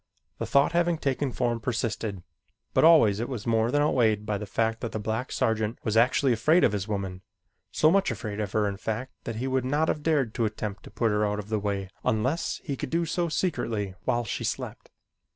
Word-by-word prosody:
The - - -2
thought 140 +3 +4
having 170 0 +2
taken 135 -2 -1
form 120 -1 -1
persisted, 110 -5 -2 0.5
but - - +3
always 150 -12 +6
it 120 - -3
was 120 -6 -5
more 115 0 +2
than 145 +3 +2
outweighed 110 -7 +2
by 105 -1 -1
the 105 - -6
fact 115 +2 0
that 115 - -4
the 110 - -2
black 110 +4 -3
sergeant 110 +1 0
was 110 -1 -1
actually 125 +3 +4
afraid 155 +10 +3
of - - +5
his 100 -1 -3
woman, 95 -3 -3 0.5
so 155 - +4
much 195 +1 +3
afraid 105 -2 -4
of 105 -3 -2
her 105 -1 +2
in 100 -1 -3
fact 110 +5 -4
that 115 - -4
he 120 +4 -3
would 130 -1 0
not 145 +5 +1
have 150 - -1
dared 145 -7 +1
to 115 - 0
attempt 105 -1 -4
to - - -10
put 115 -2 0
her 105 0 +1
out 105 0 0
of 105 0 -6
the 110 -1 0
way 100 -1 -2 0.2
unless 130 +10 0
he 140 - -3
could 130 - -5
do 170 +3 +1
so 170 +1 -1
secretly 115 - -1
while 120 -2 +1
she - - -4
slept. - - -4
115 Hz, 225 wpm, -27 LUFS, 105-135 Hz, 0.5 s, always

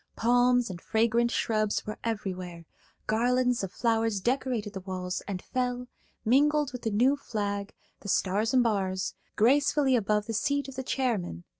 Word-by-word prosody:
Palms 245 -1 +3
and 175 -2 -8
fragrant 230 +1 +2
shrubs 215 -3 0
were 215 +1 -6
everywhere; 185 -6 -4 0.4
garlands 245 +1 +1
of 190 - -4
flowers 225 -3 +1
decorated 240 -2 -1
the 190 - -5
walls 185 -1 -4
and 190 -3 -4
fell, 250 -1 -2 0.4
mingled 290 +4 +3
with 250 -1 -7
the 225 - -1
new 245 +7 +3
flag–the 205 -4 -5
stars 200 +4 +1
and 255 -2 +4
bars–gracefully 230 +7 +1
above 210 -2 +1
the 225 - -4
seat 285 +6 0
of 270 - -9
the 265 - -3
chairman. 225 - -2
225 Hz, 145 wpm, -28 LUFS, 200-250 Hz, 0.4 s, and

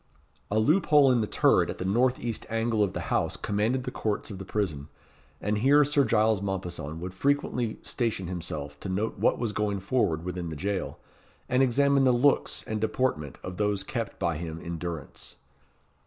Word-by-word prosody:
A 105 - 0
loop 155 - +3
hole 145 -3 +6
in 120 -2 +3
the 105 - -1
turret - - +3
at - - -4
the 90 - -4
north 125 +6 +2
east 115 -2 -4
angle 115 -1 0
of 100 - -1
the - - -3
house - - +1
commanded 110 +6 0
the 125 - -4
courts 110 -2 -2
of 95 - -7
the 95 - -7
prison, 85 -9 -2 0.5
and 105 +1 -1
here 140 +5 +5
Sir 145 0 +3
Giles 110 -2 +2
Mompesson 90 -6 -4
would 90 +1 -6
frequently 125 0 0
station 115 -6 -2
himself 80 -5 -5
to 95 - -6
note 100 +4 -2
what - - +3
was 120 -3 -1
going 105 -2 -1
forward 95 -6 0
within 90 -2 -4
the 80 - -5
jail, 95 +5 -3 0.5
and 125 +1 +2
examine 140 +2 +3
the 130 - +5
looks 130 +4 +2
and 110 -1 -3
deportment 110 - -1
of 90 0 -6
those 105 -2 0
kept 115 +2 -4
by 85 -2 -1
him 80 0 -5
in 85 -1 -6
durance. 85 -4 -6
105 Hz, 190 wpm, -27 LUFS, 90-125 Hz, 0.5 s, hole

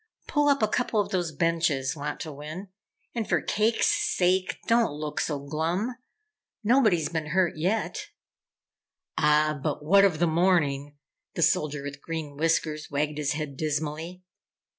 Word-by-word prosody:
Pull 295 -2 +2
up 280 -5 +2
a - - +5
couple 225 0 0
of 205 - -1
those 175 -4 -1
benches, 160 -3 0
Wantowin, 150 +4 -6 0.4
and 230 -3 -3
for - - +3
cake's 220 +2 +1
sake, 185 +1 +1
don't 230 -7 +3
look 150 0 -4
so 150 - -1
glum! 165 - -2 0.7
Nobody's 215 - +3
been 160 -2 -3
hurt 180 +2 +1
yet!" 185 +8 -1 1.1
"Ah 150 0 +3
but 150 0 -3
what 195 +5 +6
of 190 -6 +3
the 175 - +2
morning?" 155 -5 +1 0.4
The 170 - +1
Soldier 150 -2 +1
with 140 0 -7
Green 160 -3 -5
Whiskers 155 0 0
wagged 150 +1 -1
his 150 0 0
head, 150 -2 -4
dismally. 155 +4 -3
160 Hz, 140 wpm, -27 LUFS, 150-185 Hz, 1.1 s, what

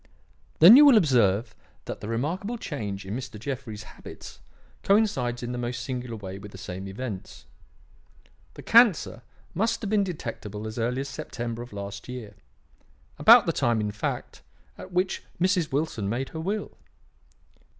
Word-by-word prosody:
"Then 180 +9 +10
you 290 - +9
will 280 -6 +8
observe 120 - +3 0.3
that - - -6
the 105 - -6
remarkable 170 - -2
change 105 - -5
in 100 +3 -4
Mr. 120 -4 -7
Jeffrey's 115 -3 -5
habits - - -12 0.4
coincides 135 - +1
in 120 - -4
the 125 - -4
most 120 0 -3
singular 125 -2 -4
way 95 -2 -7
with 100 0 -10
the - - -11
same 95 +2 -7
events. 100 0 -7 1.1
The - - -10
cancer 220 - +4 0.3
must 225 +5 0
have 210 -2 -4
been 210 -2 +3
detectable 115 - -6
as 110 +2 -5
early 125 +3 0
as 140 - -5
September 120 -3 -5
of 120 - -9
last 100 +1 -7
year; 120 -5 -7 0.9
about - - +8
the - - 0
time, 120 -2 +1
in 105 -1 -1
fact, 105 - -4 0.3
at 185 - -11
which 180 +1 0 0.2
Mrs. 180 -3 +1
Wilson 135 -8 -1
made 125 +5 -2
her 160 - -7
will. 200 +5 -4
125 Hz, 160 wpm, -26 LUFS, 105-175 Hz, 1.1 s, Then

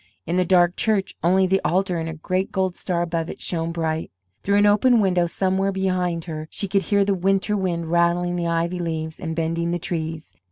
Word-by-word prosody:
In 170 - -2
the 185 0 +2
dark 175 -1 +4
church 210 -3 0
only 185 +3 +4
the 190 +1 +2
altar 180 +2 +1
and 165 0 -3
a 160 - -6
great 185 +4 -2
gold 190 -2 0
star 175 -1 -2
above 165 -1 -2
it - - -7
shone 165 -1 -2
bright. 160 -1 -2 0.3
Through 200 +1 +2
an 205 - +5
open 225 +4 +4
window 180 -4 +2
somewhere 190 +2 0
behind 185 -3 -1
her 155 -2 -6
she 200 - -4
could 195 +1 +1
hear 200 0 +2
the 200 - +2
winter 195 +2 +1
wind 170 -4 -2
rattling 175 +1 +2
the 170 -1 -1
ivy 170 +2 -1
leaves 160 -2 -4
and 160 -3 -4
bending 165 +1 -1
the 175 - 0
trees. 160 -2 -5
175 Hz, 210 wpm, -23 LUFS, 165-190 Hz, 0.3 s, an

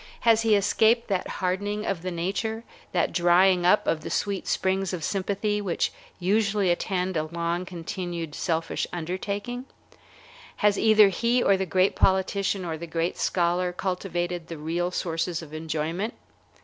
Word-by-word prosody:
Has 225 -1 +5
he 225 -2 +4
escaped 225 +4 +3
that 190 -2 0
hardening 205 +3 -2
of 190 -4 -2
the 185 - -3
nature, 200 +6 -2 0.3
that 175 - 0
drying 175 +1 +4
up 205 +3 +4
of 155 - 0
the - - -6
sweet 200 -2 -2
springs 190 0 0
of 170 -3 -4
sympathy, 205 +2 -1
which 185 -4 -1 0.3
usually 200 0 +2
attend 185 +1 -1
a 155 -1 0
long 170 +2 -2
continued 170 -2 -5
selfish 165 +1 -1
undertaking? 200 +8 -4 0.9
Has 210 -1 +3
either 215 -2 +6
he 235 +6 +1
or 200 - +5
the 190 0 -2
great 185 +3 +2
politician 190 0 +1
or 160 -2 -4
the 170 - -6
great 165 +1 -1
scholar 180 0 +1
cultivated 175 -2 -3
the 165 - -7
real 170 +4 -1
sources 170 -1 -2
of 155 -1 -12
enjoyment? 160 +6 -3
185 Hz, 150 wpm, -26 LUFS, 170-200 Hz, 0.9 s, either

